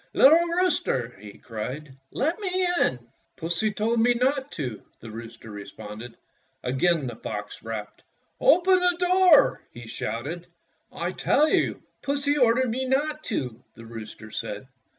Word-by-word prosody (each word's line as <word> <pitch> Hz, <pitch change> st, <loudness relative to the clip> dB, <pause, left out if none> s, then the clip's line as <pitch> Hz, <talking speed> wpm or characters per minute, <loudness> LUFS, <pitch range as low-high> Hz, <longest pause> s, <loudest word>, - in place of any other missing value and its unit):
"Little 325 Hz, +5 st, +7 dB
rooster," 335 Hz, -, 0 dB
he 105 Hz, -1 st, -11 dB
cried, 130 Hz, +6 st, -6 dB, 0.2 s
"let 315 Hz, -, -1 dB
me 370 Hz, -2 st, +1 dB
in!" 125 Hz, -2 st, 0 dB, 0.3 s
"Pussy 175 Hz, +7 st, 0 dB
told 220 Hz, +3 st, 0 dB
me 240 Hz, +2 st, +4 dB
not 265 Hz, +3 st, 0 dB
to," 125 Hz, -8 st, -4 dB, 0.2 s
the 115 Hz, -, -10 dB
rooster 115 Hz, 0 st, -9 dB
re 100 Hz, -1 st, -7 dB
sponded. 110 Hz, +2 st, -9 dB, 0.5 s
Again 145 Hz, +4 st, +1 dB
the 120 Hz, -2 st, -5 dB
fox 105 Hz, -1 st, -6 dB
rapped. 110 Hz, -2 st, -6 dB, 0.4 s
"Open 370 Hz, -5 st, +5 dB
the 360 Hz, -1 st, +3 dB
door," 360 Hz, -3 st, +5 dB
he 120 Hz, 0 st, -10 dB
shouted. 140 Hz, +11 st, -4 dB, 0.4 s
"I -, -, -3 dB
tell 305 Hz, -, +3 dB
you -, -, +1 dB, 0.2 s
Pussy 285 Hz, +1 st, +1 dB
ordered 250 Hz, -2 st, +3 dB
me 260 Hz, +3 st, -1 dB
not 295 Hz, +4 st, 0 dB
to," 125 Hz, -, -3 dB
the 115 Hz, -, -12 dB
rooster 110 Hz, -1 st, -9 dB
said. 105 Hz, +6 st, -5 dB
175 Hz, 145 wpm, -26 LUFS, -, 0.5 s, Little